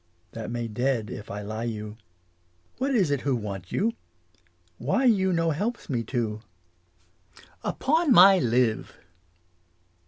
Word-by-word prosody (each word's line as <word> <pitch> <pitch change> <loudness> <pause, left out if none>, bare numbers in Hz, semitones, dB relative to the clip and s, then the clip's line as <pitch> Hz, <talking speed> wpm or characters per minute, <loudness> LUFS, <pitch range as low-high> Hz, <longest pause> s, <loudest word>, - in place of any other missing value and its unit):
That 115 -1 -6
may 120 0 -3
dead 115 -2 -1
if 105 - -8
I 105 +1 -5
lie 110 +3 -4
you. 105 -2 -5 0.8
What 270 - 0
is 185 -10 +2
it 140 -2 0
who 140 -2 0
want 100 -6 -6
you? 225 +4 0 0.9
Why 150 - +1
you 195 -6 +3
no 165 -1 +1
helps 205 +5 -3
me 120 -3 0
to? 110 -3 -2 1.2
Upon 315 +2 +1
my 195 -2 +8
live. 120 -3 0
125 Hz, 130 wpm, -26 LUFS, -, 1.2 s, my